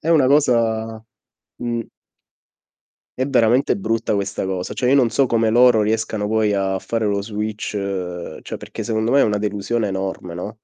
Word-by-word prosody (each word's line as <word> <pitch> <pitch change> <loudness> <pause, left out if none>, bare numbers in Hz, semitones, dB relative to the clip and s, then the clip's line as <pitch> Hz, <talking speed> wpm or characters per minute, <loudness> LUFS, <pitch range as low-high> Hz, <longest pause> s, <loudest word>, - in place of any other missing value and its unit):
È 160 - -5
una 155 -6 +5
cosa 115 -5 +2 0.6
mh. 120 -1 -2 1.3
È 130 - 0
veramente 125 0 +3
brutta 110 +2 -1
questa 100 0 -2
cosa, 95 -1 -3
cioè, 125 - 0
io 140 - +5
non 125 -4 +4
so 135 +3 +2
come 115 -2 +1
loro 120 -1 +5
riescano 110 -1 -1
poi 110 -1 +1
a 95 -1 0
fare 115 +1 -2
lo 100 -1 0
switch 105 0 -4 0.7
cioè - - -6
perché - - -7
secondo 110 +1 -1
me 140 - +5
è - - +6
una 105 -1 +1
delusione 105 +2 -1
enorme, 95 -3 -4
no? 90 +5 -5
110 Hz, 170 wpm, -20 LUFS, 105-120 Hz, 1.3 s, è